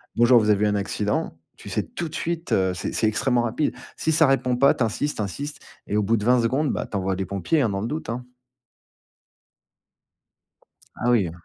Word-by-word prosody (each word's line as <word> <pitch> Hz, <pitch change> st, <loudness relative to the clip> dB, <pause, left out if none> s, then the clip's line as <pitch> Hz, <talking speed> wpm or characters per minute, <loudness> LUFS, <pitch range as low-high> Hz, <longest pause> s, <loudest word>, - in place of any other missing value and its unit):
«Bonjour, 120 Hz, 0 st, +5 dB
avez 105 Hz, -1 st, +3 dB
eu -, -, +3 dB
un 105 Hz, -, +1 dB
accident?», 105 Hz, -, -2 dB, 0.2 s
tu -, -, -10 dB
sais -, -, 0 dB
tout 170 Hz, -, -5 dB
de -, -, -15 dB
suite, 170 Hz, 0 st, -3 dB
heu, 95 Hz, -1 st, +2 dB
c'est -, -, -3 dB
c'est 110 Hz, -, +2 dB
extrêmement 120 Hz, +3 st, +1 dB
rapide. 120 Hz, +6 st, -1 dB, 0.2 s
Si 160 Hz, -, 0 dB
ça 160 Hz, -1 st, +5 dB
répond 125 Hz, -2 st, +2 dB
pas, 140 Hz, +2 st, +5 dB
tu -, -, 0 dB
insistes, 130 Hz, +7 st, -1 dB
tu 105 Hz, -, -1 dB
insistes 145 Hz, +9 st, -5 dB, 0.3 s
et 105 Hz, -, 0 dB
au 105 Hz, -, +2 dB
bout 115 Hz, +3 st, +2 dB
de 105 Hz, -, -4 dB
20 125 Hz, 0 st, +4 dB
secondes, 135 Hz, +5 st, +1 dB, 0.2 s
tu 105 Hz, -, -1 dB
envoies 95 Hz, 0 st, -1 dB
des 95 Hz, +1 st, -3 dB
pompiers, 100 Hz, -, 0 dB
hein, 115 Hz, -, +2 dB
dans 100 Hz, 0 st, -2 dB
le 115 Hz, -, -2 dB
doute, 150 Hz, -5 st, -4 dB
hein. 125 Hz, +2 st, -4 dB, 2.7 s
Ah 120 Hz, -, -1 dB
oui, 110 Hz, -7 st, +3 dB
heu 80 Hz, -, -6 dB
115 Hz, 215 wpm, -24 LUFS, 105-140 Hz, 2.7 s, Bonjour